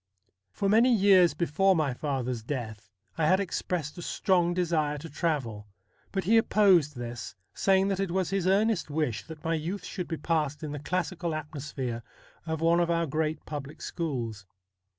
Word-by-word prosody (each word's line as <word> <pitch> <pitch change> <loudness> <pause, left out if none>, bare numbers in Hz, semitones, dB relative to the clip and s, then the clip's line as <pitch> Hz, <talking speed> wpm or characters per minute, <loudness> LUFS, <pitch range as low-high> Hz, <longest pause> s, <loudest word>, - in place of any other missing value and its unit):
For 195 - -1
many 230 +5 +5
years 190 - +5
before 185 +4 +2
my 150 -5 +1
father's 125 -3 -2
death 115 -4 -5 0.3
I 155 - +3
had 185 +3 +4
expressed 175 -4 -3
a - - -5
strong 175 -1 +1
desire 160 -4 0
to 165 +3 -9
travel; 130 -10 -2 0.4
but 195 -1 -1
he 220 +6 +4
opposed 190 - +4
this, 120 -1 -6 0.2
saying 195 0 +3
that 195 -1 -1
it 195 -2 0
was 185 +1 -1
his 195 -2 0
earnest 205 -1 +2
wish 145 -6 -1
that 160 -2 -10
my 165 - 0
youth 175 +5 -3
should 180 - -5
be 165 - -3
passed 150 -4 -1
in 150 - -4
the 145 - -4
classical 175 +1 -2
atmosphere 140 -5 -5 0.5
of 160 0 -2
one 165 +1 +4
of 170 -1 +1
our 170 0 +2
great 155 +1 -2
public 145 -1 -6
schools. 120 - -4
160 Hz, 170 wpm, -28 LUFS, 145-185 Hz, 0.5 s, many